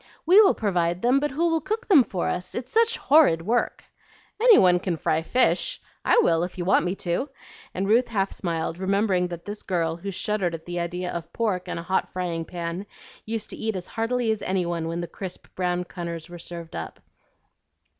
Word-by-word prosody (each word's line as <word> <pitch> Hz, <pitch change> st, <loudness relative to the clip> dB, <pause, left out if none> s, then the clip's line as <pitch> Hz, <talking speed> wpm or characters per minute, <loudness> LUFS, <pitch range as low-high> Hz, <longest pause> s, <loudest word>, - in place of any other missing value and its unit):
"We 370 Hz, +6 st, +8 dB
will 395 Hz, -, +5 dB
provide 175 Hz, -4 st, 0 dB
them, 250 Hz, +3 st, +4 dB
but 295 Hz, +1 st, 0 dB
who 320 Hz, +5 st, 0 dB
will 325 Hz, -1 st, +1 dB
cook 435 Hz, +4 st, -3 dB
them 320 Hz, -, +7 dB
for 190 Hz, -5 st, -3 dB
us? 180 Hz, 0 st, -3 dB
It's 245 Hz, +1 st, -5 dB
such 460 Hz, +1 st, +3 dB
horrid 275 Hz, -, +4 dB
work." 235 Hz, +6 st, 0 dB, 0.6 s
"Any 475 Hz, -2 st, +8 dB
one 180 Hz, -1 st, +5 dB
can 180 Hz, -2 st, -2 dB
fry 155 Hz, 0 st, 0 dB
fish! 255 Hz, -, +1 dB, 0.2 s
I -, -, +4 dB
will 165 Hz, 0 st, +3 dB
if 175 Hz, +1 st, -4 dB
you 175 Hz, -, -3 dB
want 190 Hz, -2 st, +3 dB
me 180 Hz, +2 st, -1 dB
to;" 175 Hz, +12 st, -1 dB, 0.5 s
and 190 Hz, +2 st, -1 dB
Ruth 235 Hz, +4 st, +4 dB
half 200 Hz, -4 st, -1 dB
smiled, 165 Hz, -1 st, -3 dB
remembering 190 Hz, -1 st, +1 dB
that 170 Hz, -1 st, -8 dB
this 205 Hz, +1 st, -6 dB
girl 165 Hz, -3 st, -1 dB
who 195 Hz, +4 st, -6 dB
shuddered 195 Hz, -2 st, -1 dB
at 160 Hz, -, -10 dB
the 175 Hz, 0 st, -4 dB
idea 180 Hz, +1 st, -3 dB
of 170 Hz, 0 st, -6 dB
pork 205 Hz, -6 st, -1 dB
and -, -, -3 dB
a 170 Hz, -, -5 dB
hot 190 Hz, +2 st, 0 dB
frying 170 Hz, -3 st, -3 dB
pan, 175 Hz, +3 st, -5 dB, 0.4 s
used 220 Hz, -1 st, -4 dB
to -, -, -6 dB
eat 220 Hz, -1 st, -2 dB
as 180 Hz, -1 st, -4 dB
heartily 230 Hz, +1 st, -1 dB
as 220 Hz, -, -2 dB
any 185 Hz, -1 st, 0 dB
one 170 Hz, -1 st, -2 dB
when 165 Hz, +1 st, -3 dB
the 170 Hz, -, -4 dB
crisp 185 Hz, 0 st, -8 dB
brown 180 Hz, -1 st, -1 dB
cunners 170 Hz, -2 st, -6 dB
were 175 Hz, 0 st, -9 dB
served 170 Hz, -1 st, -8 dB
up. 80 Hz, -1 st, -6 dB
185 Hz, 210 wpm, -25 LUFS, 170-225 Hz, 0.6 s, We